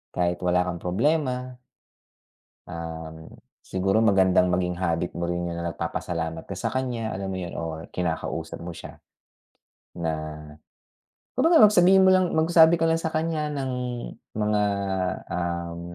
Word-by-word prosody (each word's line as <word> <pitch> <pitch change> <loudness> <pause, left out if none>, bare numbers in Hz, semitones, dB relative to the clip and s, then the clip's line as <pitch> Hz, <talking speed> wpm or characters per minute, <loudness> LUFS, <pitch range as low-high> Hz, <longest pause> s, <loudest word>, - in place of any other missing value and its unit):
kahit 90 0 0
wala 90 0 +3
kang 90 -1 -4
problema 125 - 0 1.1
um, 80 -1 -7 0.3
siguro 95 +3 +1
magandang 95 -3 +4
maging 90 0 0
habit 85 -1 0
mo 85 0 -2
rin 85 0 -2
yun 85 - -4
na 85 0 -3
nagpapasalamat 80 -1 -4
ka 95 - -4
sa - - -2
kanya, 125 -4 -2
alam 95 0 -4
mo 95 - -3
yun? 90 -2 -6
Or 80 -1 -5
kinakausap 85 -3 -3
mo 85 0 -7
siya. - - -10 1.0
Na 80 -2 -2 1.3
kumbaga 330 -5 +6
mag 210 - -2
sabihin 190 +1 +6
mo 190 - +6
lang 185 -1 +3
magsabi 160 +1 +5
ko - - +3
lang 165 - +2
sa 160 -1 -3
kanya 155 -1 -1
ng 135 -2 -3 0.7
mga, 105 -1 +1 0.7
um 85 -1 -3
95 Hz, 145 wpm, -25 LUFS, 85-135 Hz, 1.3 s, kumbaga